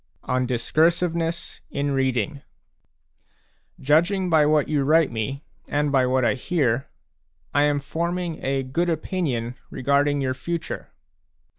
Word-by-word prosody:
ON 130 0 0
DISCURSIVENESS 165 +6 0
IN 140 0 -1
READING 135 0 0 1.4
Judging 175 +6 +2
by 155 -2 +5
what 150 -1 +3
you 145 -2 +1
write 155 +1 +4
me, 130 +6 -3 0.2
and 145 0 0
by 130 -2 +3
what 130 -1 +2
I - - +3
hear, 135 -3 0 0.7
I 145 +1 +4
am 145 -1 +2
forming 170 +3 -3
a 135 0 0
good 165 +7 -1
opinion 155 -8 -2 0.2
regarding 140 +2 +1
your 130 -1 0
future. 165 +5 -5
145 Hz, 125 wpm, -24 LUFS, 130-165 Hz, 1.4 s, by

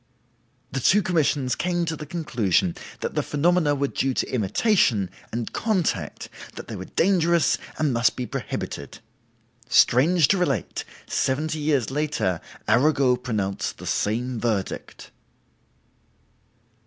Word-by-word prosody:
"The 135 - -2
two 195 +11 +4
commissions 150 -7 +1
came 175 -1 0
to 160 -1 -2
the 150 -1 -8
conclusion 115 - 0 0.3
that - - -3
the - - +1
phenomena 155 0 +2
were 140 0 0
due 135 -1 -1
to - - -2
imitation, 110 - +2 0.2
and 115 0 -4
contact, 210 -8 -1 0.3
that - - -8
they - - -6
were - - -6
dangerous 170 -5 +2 0.2
and 150 -4 +1
must 120 +1 +2
be 125 - -3
prohibited. 70 -9 -5 0.7
Strange 145 +7 +5
to 195 - +3
relate, 140 - -1 0.2
seventy 155 +4 -1
years 145 -6 +1
later, 145 - -1 0.3
Arago 135 0 +4
pronounced 110 -6 -3
the - - -10
same 120 +3 -1
verdict!" 110 -5 -3
140 Hz, 125 wpm, -24 LUFS, 120-160 Hz, 0.7 s, Strange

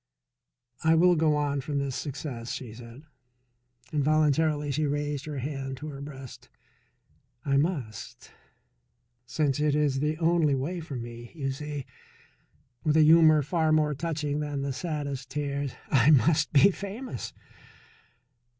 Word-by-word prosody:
"I 160 0 +5
will 175 +2 +5
go 155 -1 +3
on 145 -1 0
from 145 +1 -3
this 140 -2 -2
success," 130 -4 -5
she 120 -5 -6
said. 120 +4 -12 0.9
Involuntarily 150 0 +2
she 150 +2 0
raised 145 0 -2
her 150 -2 -5
hand 135 0 -4
to 150 +3 -7
her 140 -1 -8
breast. 135 -3 -10 1.0
"I 140 -1 +2
must, 140 - -3 1.0
since 145 0 0
it 150 -1 +2
is 145 -3 +1
the 150 +2 0
only 165 -3 +2
way 155 +7 -3
for 155 -4 -7
me. 120 0 -8
You 135 -4 -2
see," 145 0 -5 1.0
with 155 0 +2
a 155 - +7
humour 155 -1 +6
far 160 +2 +1
more 155 -1 +3
touching 150 -1 -2
than 145 -2 -3
the 140 -1 -2
saddest 140 -4 -4
tears, 140 -1 -3 0.2
"I 130 -1 +5
must 155 +2 +4
be 165 +7 +6
famous." 200 - -6
145 Hz, 140 wpm, -27 LUFS, 135-155 Hz, 1.0 s, a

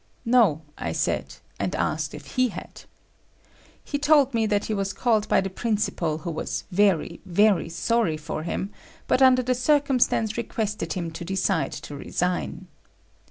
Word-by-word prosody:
No, 225 -11 +4 0.2
I - - -2
said, - - -1 0.2
and - - -1
asked - - -1
if - - -11
he 255 -1 +3
had. 225 - -9 1.0
He 285 - -3
told 285 -2 +4
me 225 -1 +2
that 205 -1 +1
he 220 - -2
was 195 -1 -1
called 220 -4 +1
by - - +3
the 195 - -3
principal 195 -7 -1
who 165 +2 -5
was 155 - -3
very, 180 -3 +2
very 195 0 +3
sorry 170 0 0
for 155 0 -5
him 185 +4 -3 0.3
but 255 - +2
under 255 -1 +6
the 255 +1 +1
circumstance 255 -4 +2
requested 210 -6 -2
him 170 -3 -3
to 165 - -7
decide 190 -1 0
to 145 - -7
resign. 180 +5 -2
205 Hz, 160 wpm, -25 LUFS, 175-240 Hz, 1.0 s, under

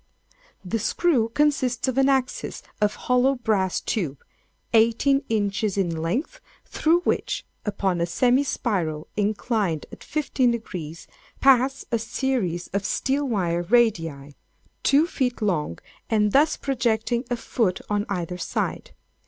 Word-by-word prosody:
"The 225 +5 -1
screw 235 +1 +1
consists 265 -2 +1
of 260 - 0
an 270 0 +4
axis 265 -2 -1 0.2
of 210 0 +2
hollow 250 +2 +3
brass 210 -6 0
tube, 155 -11 -3 0.5
eighteen 230 +5 +4
inches 205 -2 0
in 175 -4 0
length, 210 - -2 0.2
through 335 +3 +2
which, - - -1 0.2
upon 195 -4 0
a 170 - +1
semi 250 +8 +3
spiral 175 - -2
inclined 210 - 0
at - - -11
fifteen 275 -4 0
degrees, 175 -9 -5 0.3
pass 270 0 +4
a 230 - +1
series 225 -7 -1
of 200 +1 -2
steel 275 +7 0
wire 175 -7 0
radii, 165 - +1 0.5
two 285 +3 +4
feet 255 -7 -2
long, 175 - -1 0.3
and 210 -2 +2
thus 300 +5 +4
projecting 235 -2 0
a 245 - -1
foot 220 -5 0
on 205 0 -1
either 180 -2 -3
side. - - -3
225 Hz, 130 wpm, -24 LUFS, 185-260 Hz, 0.5 s, an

